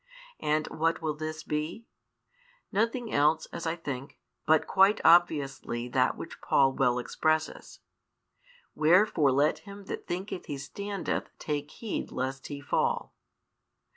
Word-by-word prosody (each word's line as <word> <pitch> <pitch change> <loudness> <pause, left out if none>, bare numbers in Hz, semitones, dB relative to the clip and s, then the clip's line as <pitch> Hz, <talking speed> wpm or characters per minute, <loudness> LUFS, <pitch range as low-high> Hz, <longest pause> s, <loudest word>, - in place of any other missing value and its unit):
And 155 +1 +1
what 165 +1 0
will 155 -1 0
this 155 +1 -5
be? 155 +9 -3 0.9
Nothing 230 +3 0
else, 150 +2 +3
as 170 - -4
I 160 - 0
think, 140 -5 -6 0.3
but 160 -1 +4
quite 195 +2 +4
obviously 145 -8 +3
that 125 0 +2
which - - -9
Paul 135 -1 +3
well 125 -3 +2
expresses: 155 +5 -1 0.9
Wherefore 160 -3 +4
let 145 +4 +2
him 200 0 -11
that - - -6
thinketh 185 +1 -4
he 145 - -4
standeth 200 +8 -4
take 145 -1 -3
heed 225 -3 -5
lest 130 +1 -3
he 145 -1 -6
fall. 145 - 0
155 Hz, 130 wpm, -29 LUFS, 140-180 Hz, 0.9 s, but